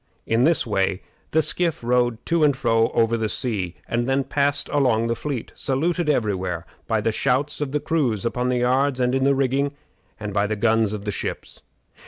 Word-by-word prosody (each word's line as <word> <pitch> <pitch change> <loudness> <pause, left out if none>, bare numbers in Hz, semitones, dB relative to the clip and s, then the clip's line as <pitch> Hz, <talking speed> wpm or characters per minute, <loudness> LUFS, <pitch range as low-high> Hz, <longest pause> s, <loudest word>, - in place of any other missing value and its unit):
In 115 +2 +2
this 165 +1 +2
way 95 -3 0 0.3
the 160 0 +2
skiff 170 -6 +1
rowed 120 -1 +1
to 170 -2 +2
and 145 -3 +3
fro 115 -2 +2
over 115 0 +3
the 110 -2 -1
sea, 100 -9 -2
and 120 +2 -1
then 135 +1 +2
passed 145 +1 +1
along 125 -6 +2
the 115 0 0
fleet, 135 -2 -5
saluted 165 +4 -1
every 115 -8 +2
where 90 -2 -4 0.2
by 110 -2 +1
the 115 - +1
shouts 140 +7 0
of 145 -3 -2
the 150 - 0
crews 140 -9 0
upon 125 +2 -1
the 125 - +1
yards 130 +2 +1
and 125 0 +1
in 135 0 +1
the 140 0 +4
rigging, 135 +1 0 0.5
and 105 -2 -5
by 100 +1 +1
the 110 - -1
guns 110 0 +2
of 105 -1 -6
the 105 - -1
ships. - - -6
125 Hz, 205 wpm, -23 LUFS, 110-140 Hz, 0.5 s, the